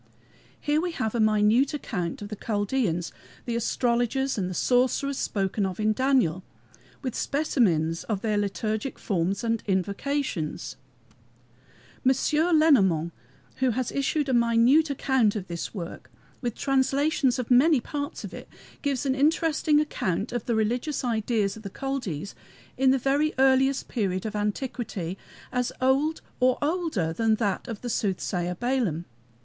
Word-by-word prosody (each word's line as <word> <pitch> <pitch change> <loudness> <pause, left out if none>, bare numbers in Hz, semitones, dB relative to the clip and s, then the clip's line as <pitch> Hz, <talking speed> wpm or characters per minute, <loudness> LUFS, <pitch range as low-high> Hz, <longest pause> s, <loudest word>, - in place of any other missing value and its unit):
Here 300 +1 +1
we 350 -1 -2
have 220 -8 -2
a 235 - -1
minute 215 +6 +3
account, 190 - -4
of 205 - -7
the 210 - -5
Chaldeans 205 -5 -1 0.3
the 235 - -2
astrologers 245 +3 0
and 185 -4 -2
the 185 - -5
sorcerers 260 +5 +1
spoken 195 0 -1
of 190 0 -3
in 215 0 +2
Daniel 240 - +2 0.6
with 255 -3 -2
specimens 180 - +1
of 205 -4 -2
their 215 -2 +1
liturgic 215 +4 -2
forms 195 +1 -1
and 230 -1 0
invocations. 200 - -2 1.3
M. 260 +1 +4 0.4
Lenormant, 190 - +4 0.4
who 260 -1 +2
has 245 +1 -1
issued 280 +1 0
a 265 - 0
minute 240 +6 +4
account 265 -6 +2
of 195 -3 -4
this 170 -1 -5
work 175 -6 -7 0.3
with 240 -4 -2
translations 275 0 +1
of 250 -1 -4
many 275 +4 +6
parts 285 +5 -5
of - - -7
it, - - -9 0.3
gives 280 -1 -1
an 265 - +2
interesting 305 +1 +2
account 205 - -1
of 240 -3 -3
the 235 - +1
religious 240 +8 -1
ideas 220 -3 0
of 220 - -10
the 200 - -6
Chaldees 220 - -3 0.4
in 265 +1 +3
the 265 - +4
very 280 +4 +1
earliest 265 +1 +3
period 190 -5 -2
of 215 0 -4
antiquity, 210 -4 -3 0.4
as 250 -1 0
old 275 +5 +2 0.2
or 255 0 +3
older 295 - -1
than 220 +5 +2
that 205 -4 -1
of 225 -4 -6
the 245 - -5
soothsayer 180 -4 -1
Balaam. 230 - -1
235 Hz, 145 wpm, -26 LUFS, 200-270 Hz, 1.3 s, many